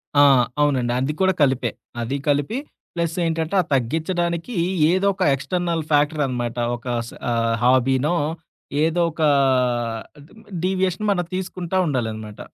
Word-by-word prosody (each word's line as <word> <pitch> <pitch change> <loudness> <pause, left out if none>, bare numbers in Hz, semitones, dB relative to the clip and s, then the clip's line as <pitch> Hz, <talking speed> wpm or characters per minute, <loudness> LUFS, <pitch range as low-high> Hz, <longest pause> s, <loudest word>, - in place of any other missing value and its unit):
ఆ! 145 - +6 0.4
అవునండి. 130 -5 +2
అది 135 +4 -1
కూడా 190 0 +4
కలిపే. 135 -3 +2 0.3
అది 125 +4 -2
కలిపి, 145 - +1 0.4
ప్లస్ 170 -1 -2
ఏంటంటే, 165 +2 -1
ఆ - - -4
తగ్గించడానికి 170 - -1 0.4
ఏదోక 195 +1 +1
ఎక్స్‌టర్నల్ 170 +4 -2
ఫ్యాక్టర్ 150 +1 +2
అనమాట 120 -2 -3 0.2
ఒక 120 - -13 0.2
స్ - - -13 0.2
ఆహ్, 115 -1 +1
హాబీనో 130 +5 +3 0.7
ఏదోక 165 0 0 1.1
డీ - - -19 0.3
డీవియేషన్ 185 +1 0
మనం 175 -3 0
తీసుకుంటా 185 -1 -3
ఉండాలనమాట. 110 -6 -3
155 Hz, 120 wpm, -22 LUFS, 130-175 Hz, 1.1 s, ఆ